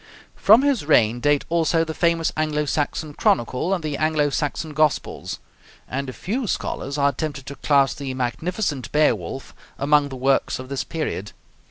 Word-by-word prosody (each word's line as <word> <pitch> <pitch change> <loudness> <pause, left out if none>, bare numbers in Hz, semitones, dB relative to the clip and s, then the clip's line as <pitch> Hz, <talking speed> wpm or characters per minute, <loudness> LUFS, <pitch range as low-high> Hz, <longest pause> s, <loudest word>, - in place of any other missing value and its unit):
From 220 +6 +6
his 280 - +2
reign 120 -6 +3
date 145 +2 +2
also 165 0 +2
the 160 - -4
famous 170 -1 +1
Anglo 155 -1 0
Saxon 150 +1 -2
Chronicle 125 +6 +1
and 185 -4 0
the 150 -2 -2
Anglo 155 -2 +1
Saxon 150 +2 -2
Gospels; 155 -1 0 0.5
and 135 +1 -3
a - - -4
few 220 - -3
scholars 140 -6 -3
are 140 0 +3
tempted 140 -1 -5
to 140 - -7
class 140 -2 +3
the 140 -1 -5
magnificent 140 - -2
'Beowulf' 135 - 0 0.2
among 145 +1 +3
the 135 - -7
works 135 +1 +1
of 130 0 -9
this 140 -1 -2
period. 155 - -4
145 Hz, 165 wpm, -23 LUFS, 135-160 Hz, 0.5 s, From